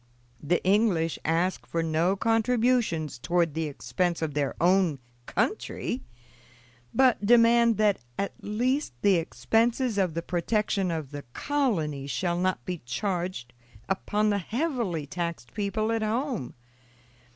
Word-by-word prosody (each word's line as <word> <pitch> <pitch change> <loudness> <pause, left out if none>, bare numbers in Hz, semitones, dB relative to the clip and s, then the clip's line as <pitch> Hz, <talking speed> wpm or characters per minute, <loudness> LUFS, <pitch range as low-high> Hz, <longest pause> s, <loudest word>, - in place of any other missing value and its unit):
The 170 +4 0
English 190 -5 +2
ask 170 +4 0
for 165 0 -1
no 165 +4 +1
contributions 225 - +1
toward 170 +2 +1
the 160 +1 -1
expense 160 +5 -2
of 155 -2 -2
their 145 -1 -1
own 180 -3 +3 0.3
country, 130 - -2 0.9
but 255 -5 +3
demand 235 +1 +5
that, 210 -2 +3 0.2
at 200 - -2
least, 250 - -1
the 200 -3 +5
expenses 225 +6 +1
of 180 -5 +1
the 170 - -2
protection 195 +2 0
of 160 -5 -3
the 145 -1 -6
colony 170 - -1
shall 175 +6 -1
not 185 +1 0
be 180 -2 -3
charged 175 - -3 0.3
upon 210 +2 0
the 200 - +1
heavily 225 - -2
taxed 170 -5 -5
people 215 +2 -1
at 225 -1 0
home. 225 - -2
185 Hz, 130 wpm, -27 LUFS, 165-225 Hz, 0.9 s, demand